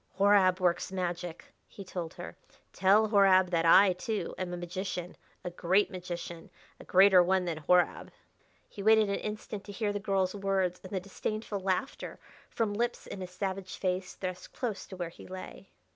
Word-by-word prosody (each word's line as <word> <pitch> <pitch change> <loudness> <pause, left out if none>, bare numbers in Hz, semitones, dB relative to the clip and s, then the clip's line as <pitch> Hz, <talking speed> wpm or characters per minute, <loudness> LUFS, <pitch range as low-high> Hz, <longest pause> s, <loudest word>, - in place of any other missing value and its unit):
"Horab 195 -2 +4
works 180 0 +1
magic," 175 -2 -4
he 200 - -10
told 175 -3 -6
her. - - -8 0.4
"Tell 205 +4 +4
Horab 190 -3 +5
that 165 -1 +2
I, 190 +3 +7
too, 210 +4 -3
am 185 -1 -4
a 175 - -4
magician 180 0 -5 0.3
a 180 - -4
great 185 +4 +2
magician 175 -2 -7 0.3
a - - -11
greater 190 0 +6
one 185 +1 +2
than 170 -3 -2
Horab." 180 +4 +2 0.6
He 200 - -9
waited 220 0 +5
an 200 - 0
instant 210 -1 -6
to 205 - -8
hear 205 0 -2
the 205 - -2
girl's 195 -2 0
words 195 -3 -1
and 185 - -10
the 195 - -1
disdainful 205 +2 -4
laughter 190 +7 -3 0.3
from 220 -3 -1
lips 240 +3 -2
in 190 - -7
a 185 - -4
savage 190 +1 -5
face 185 0 -2
thrust 185 -1 -6
close 230 -6 -4
to 190 - -9
where 175 -2 -3
he 170 - -14
lay. 185 +1 -9
190 Hz, 175 wpm, -30 LUFS, 180-200 Hz, 0.6 s, I